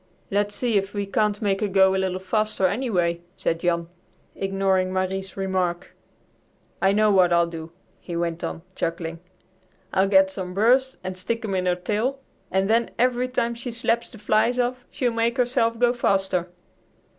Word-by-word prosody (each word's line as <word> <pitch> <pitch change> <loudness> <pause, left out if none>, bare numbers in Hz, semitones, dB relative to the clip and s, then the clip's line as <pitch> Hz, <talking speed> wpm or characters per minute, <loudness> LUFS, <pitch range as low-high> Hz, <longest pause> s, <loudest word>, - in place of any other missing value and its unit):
"Let 205 +1 +1
's - - -10
see 235 -4 +1
if 195 +1 -2
we 205 0 -1
can't 210 +1 0
make 195 -1 +1
her 210 - +1
go 190 -1 +4
a - - 0
little 190 -1 0
faster, 215 +1 0
anyway," 180 -5 0 0.2
said 165 - -1
Jan, 170 -1 0 0.5
ignoring 195 -1 0
Marie's 190 +1 -2
remark. 185 -2 -1 0.9
"I 195 - +4
know 215 +1 +3
what 185 -3 +4
I'll 170 0 +4
do," 165 -1 -8 0.3
he 175 - -7
went 170 0 -2
on, 165 - -4
chuckling; 165 0 -3 0.7
"I'll 190 +1 +3
get 190 -1 +5
some 185 -2 -5
burrs 255 +6 +3
and 185 0 -4
stick 230 +5 -3
them 205 -3 -2
in 185 -1 0
her 180 - +3
tail, 215 +9 -1 0.3
and 190 0 +1
then 230 +2 +2
every 250 +1 +2
time 240 -2 -1
she 235 +1 -6
slaps 230 0 -1
the 235 - -12
flies 215 +3 +2
off 250 0 -1
she'll 245 -3 -1
make 230 +2 0
herself 240 -2 +1
go 240 +1 +3
faster." 190 -6 +1
195 Hz, 180 wpm, -24 LUFS, 185-230 Hz, 0.9 s, get